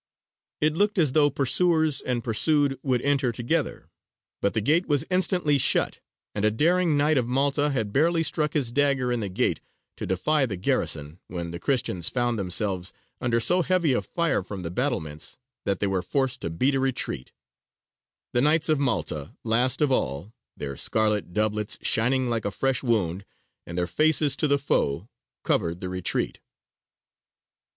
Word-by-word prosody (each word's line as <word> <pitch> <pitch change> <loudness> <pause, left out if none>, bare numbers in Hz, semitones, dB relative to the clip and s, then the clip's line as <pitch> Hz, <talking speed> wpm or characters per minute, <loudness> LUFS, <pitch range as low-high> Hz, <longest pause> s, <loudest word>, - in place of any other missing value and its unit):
It 155 0 +3
looked 205 +3 +1
as 155 -7 +3
though 145 +1 +4
pursuers 155 +2 +2
and 120 -2 -2
pursued 140 +4 +2
would 125 -3 0
enter 140 -3 +1
together; 120 +1 -2 0.5
but 100 - 0
the - - +3
gate 155 - +2
was 145 -3 +1
instantly 180 -5 +2
shut, - - +1 0.3
and 105 - -3
a 110 - +5
daring 165 +7 +2
Knight 145 0 +3
of 120 - -2
Malta 140 +3 +1
had 110 -7 -2
barely 165 +3 +2
struck 150 -2 0
his 135 -6 0
dagger 140 -2 +1
in 120 - 0
the 100 -3 -3
gate 90 - 0 0.4
to - - -5
defy 135 - +1
the 100 - -4
garrison, 75 -2 -1
when 85 -1 -5
the 85 - -6
Christians 115 - -1
found 120 -3 -1
themselves 95 -1 0 0.3
under 115 -1 +1
so 180 +10 +3
heavy 175 -5 +2
a - - +1
fire 170 - 0
from 95 -1 -7
the 85 - -4
battlements, 90 - -3 0.3
that 100 -1 +1
they 100 - -1
were 95 -2 0
forced 125 +6 -1
to - - -3
beat 125 +13 +1
a 135 - +1
retreat: 130 - -2 1.0
the 120 - +3
Knights 155 +3 +3
of 155 -2 +3
Malta, 80 - -2
last 120 +5 +1
of 145 - +2
all, 85 - -1 0.2
their 70 -1 -5
scarlet 105 +2 0
doublets 105 +1 0
shining 125 +3 +2
like 115 -2 -1
a - - +1
fresh 135 +5 0
wound, 100 -7 0 0.4
and 85 - -6
their 90 - +1
faces 150 - +3
to 155 - 0
the 140 0 +3
foe, 95 - 0 0.4
covered 85 +1 0
the 90 - -5
retreat. 90 -1 -2
125 Hz, 170 wpm, -25 LUFS, 100-145 Hz, 1.0 s, a